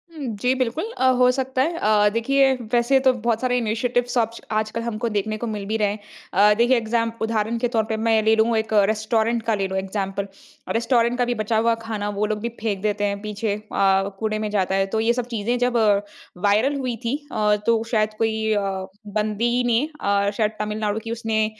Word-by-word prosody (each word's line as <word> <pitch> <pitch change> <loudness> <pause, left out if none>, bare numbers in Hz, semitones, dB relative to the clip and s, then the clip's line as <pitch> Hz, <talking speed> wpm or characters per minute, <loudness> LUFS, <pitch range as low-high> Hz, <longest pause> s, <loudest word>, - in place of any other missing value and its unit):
हुँ। 290 -4 -5
जी, 250 +1 +3
बिल्कुल 265 - -2
अ, - - -1 0.2
हो 250 0 +6
सकता 260 0 -1
है। 330 +5 0
अ, 210 -5 +3
देखिए 270 +4 +3 0.2
वैसे 240 +3 +4
तो - - +8
बहुत 235 -1 -1
सारे 250 -1 +1
इनिशिएटिव्स 245 +2 -1
सब्ष्क 230 -1 -1
आजकल 215 +1 -3
हमको 230 0 -3
देखने 215 0 -2
को 235 - -4
मिल 210 -2 -4
भी 215 +2 -1
रहे 210 -1 +2
हैं। 210 - -6 0.3
अ, 205 +2 +5
देखिए 240 +2 +4
एग्ज़ाम 230 0 0
उदाहरण 225 0 0
के 245 - +1
तौर 220 - +3
पर 220 - -1
मैं 220 -1 +4
ले 220 +1 +4
लूँ 225 +1 +2
एक 220 0 -2 0.2
रेस्टोरेंट 220 +1 0
का 225 -1 +1
ले 195 -1 -1
लूँ 190 0 -3
इग्ज़ैम्पल। 195 0 -3 0.5
रेस्टोरेंट 235 +1 +2
का 245 - +2
भी 245 - 0
बचा 220 +1 0
हुआ 230 +1 +3
खाना 215 -2 -3
वो 210 - +2
लोग 215 0 -2
भी 235 - -2
फेंक 205 -4 -2
देते 210 0 -1
हैं 200 0 -1
पीछे 210 0 -2
अ, 195 -2 +1
कूड़े 215 -1 -1
में 215 0 -2
जाता 190 -2 0
है। 195 0 +2
तो - - +2
ये 225 +2 +2
सब 245 -1 -2
चीज़ें 230 +3 0
जब 245 0 +1 0.7
वायरल 220 +8 +3
हुई 255 -3 -2
थी 235 +4 0 0.2
अ, 210 -1 +2
तो 230 -1 +2
शायद 215 -2 +1
कोई 220 0 0
अ, 205 - +1 0.5
बंदी 215 +4 0
ने 235 0 +3 0.2
अ, 200 0 +2
शायद 215 -1 +1
तमिलनाडु 210 0 -2
की 225 - -5
उसने 225 -1 0
220 Hz, 215 wpm, -22 LUFS, 210-235 Hz, 0.7 s, तो